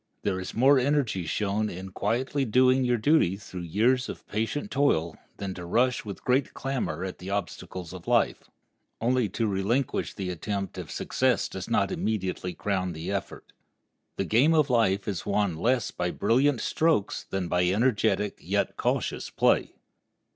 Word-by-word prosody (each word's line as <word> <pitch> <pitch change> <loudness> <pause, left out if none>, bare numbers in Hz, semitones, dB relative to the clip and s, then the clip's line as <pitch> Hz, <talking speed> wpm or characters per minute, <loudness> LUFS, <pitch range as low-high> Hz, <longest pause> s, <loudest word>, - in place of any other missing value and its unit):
There 95 -2 0
is 90 - -6
more 135 +4 +5
energy 125 - 0
shown 105 +4 0
in 95 +1 -7
quietly 130 +9 -1
doing 130 +2 +4
your 125 -1 +2
duty 110 - +3
through 95 -3 -8
years 115 +10 +1
of - - -8
patient 115 - -3
toil 85 - +1 0.2
than 100 -2 -4
to 90 - -8
rush 120 +8 +1
with 100 -4 -8
great 130 +2 +1
clamor 125 - -2
at 95 -1 -5
the 90 - -7
obstacles 95 -3 -4
of 90 -2 -10
life, - - +1 0.5
only 120 -1 +1
to 115 +5 -1
relinquish 105 +6 0
the 95 -3 -3
attempt 95 +2 -4
if 85 -5 -7
success - - 0
does - - -7
not - - +2
immediately 95 -4 -2
crown 95 -3 -1
the 80 +4 -5
effort. 100 -1 -5 0.6
The - - 0
game 140 +9 +4
of 150 -4 +3
life 100 -5 +2
is 100 -5 -3
won 100 -4 +1
less 120 +6 +1
by 90 0 -2
brilliant 125 +7 +2
strokes 155 -11 +1
than 95 -2 -3
by 90 +1 +2
energetic 105 0 +1
yet - - -1
cautious - - -1
play. - - +2
105 Hz, 160 wpm, -27 LUFS, 95-125 Hz, 0.6 s, more